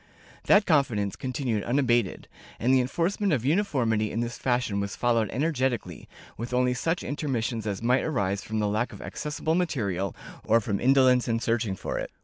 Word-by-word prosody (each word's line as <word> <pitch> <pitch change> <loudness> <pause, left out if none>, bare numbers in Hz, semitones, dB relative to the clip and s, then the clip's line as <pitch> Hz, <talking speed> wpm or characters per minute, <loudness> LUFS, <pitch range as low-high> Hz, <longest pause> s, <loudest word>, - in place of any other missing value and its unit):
That 205 0 +5
confidence 120 - +1
continued 125 -5 -2
unabated, 120 -5 +1 0.3
and 125 +3 +2
the 130 - +5
enforcement 175 +9 0
of 125 -4 0
uniformity 130 - +1
in 115 - -2
this 120 0 -2
fashion 120 -6 0
was 100 0 -3
followed 115 -4 +1
energetically, 130 - -2 0.3
with 120 +2 -4
only 125 0 +2
such 165 +7 -1
intermissions 120 -6 -2
as 100 +1 -3
might 125 +3 +3
arise 100 -9 -1
from 110 +1 -4
the 105 -1 +1
lack 110 +4 -1
of - - -10
accessible 150 +1 -3
material, 100 - -1 0.3
or 115 +1 +4
from 100 -2 -2
indolence 130 -1 +4
in 115 -1 +1
searching 115 -3 0
for - - -4
it. - - -4
120 Hz, 170 wpm, -27 LUFS, 110-135 Hz, 0.3 s, That